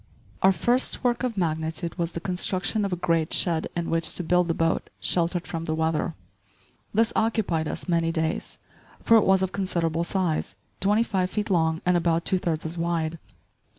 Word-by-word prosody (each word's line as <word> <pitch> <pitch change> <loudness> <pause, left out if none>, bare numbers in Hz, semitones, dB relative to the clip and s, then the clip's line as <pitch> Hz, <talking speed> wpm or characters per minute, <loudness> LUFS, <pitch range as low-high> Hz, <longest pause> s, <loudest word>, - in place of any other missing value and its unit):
* - - -29
Out 190 0 +5
first 245 +6 +2
work 240 -1 +1
of 245 -4 -2
magnitude 160 0 -1
was 170 -1 -2
the - - -3
construction 185 +3 0
of 195 - -3
a - - +1
great 165 -2 0
shed 165 -3 +2
in 170 -1 -2
which 165 0 +2
to 180 - -1
build 180 +1 +2
the 165 - 0
boat, 165 0 0
sheltered 175 0 +1
from 165 -1 -5
the 155 - -1
weather. 160 +1 -1 0.8
This 225 +2 +2
occupied 210 -8 0
us - - -5
many 165 -2 +1
days; 160 0 -2 0.5
for 230 - +5
it 220 - +3
was 190 0 +4
of 190 - -1
considerable 170 -4 -1
size, 175 -3 -1 0.2
twenty 210 +3 +3
five 190 -5 -1
feet 210 +1 -3
long 160 -2 +1
and 180 0 +3
about 170 -1 +1
two 185 - +2
thirds 165 -3 -2
as 165 +1 -5
wide. 165 -1 -1
170 Hz, 190 wpm, -25 LUFS, 165-190 Hz, 0.8 s, Out